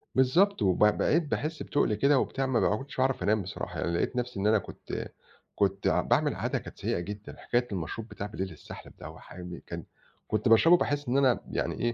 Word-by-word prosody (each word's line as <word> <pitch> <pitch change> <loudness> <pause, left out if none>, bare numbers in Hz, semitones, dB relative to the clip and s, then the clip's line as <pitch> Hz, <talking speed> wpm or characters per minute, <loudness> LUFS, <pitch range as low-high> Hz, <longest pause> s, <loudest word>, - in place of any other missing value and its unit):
بالضبط، 170 - +3
وب 95 0 +3
بقيت 150 +10 +3
باحس 155 +2 -3
بتُقل 130 -6 +1
كده 140 +5 +4
وبتاع 135 0 -1
ما 130 -3 +1
ب 105 - +2
كُنتش 135 -1 -8
اعرف 130 0 +1
أنام 110 0 +2
بصراحة 95 +2 -6
يعني 85 - -1
لقيت 85 +8 -1
نَفسي 125 -4 -3
إن 100 - +1
أنا 110 0 +5
كنت 95 - -6 0.5
كنت 100 -1 +1
ع - - +3
باعمل - - +1
عادة - - -1
كانت - - -11
سيئة - - -1
جدًا. 105 +4 -7
حكاية 120 0 0
المشروب 100 +5 -4
بتاع 105 - -6
بليل 95 -3 -4
السَحلَب 75 - -11
ده - - -8
وحامي 90 -1 -9
كان - - -6 0.4
كُنت 110 +2 0
باشربه 165 +10 +7
باحس 145 -3 -1
إن 130 +3 +2
أنا 130 -3 +4
يعني - - -2
إيه 120 0 0
115 Hz, 205 wpm, -29 LUFS, 100-135 Hz, 0.5 s, باشربه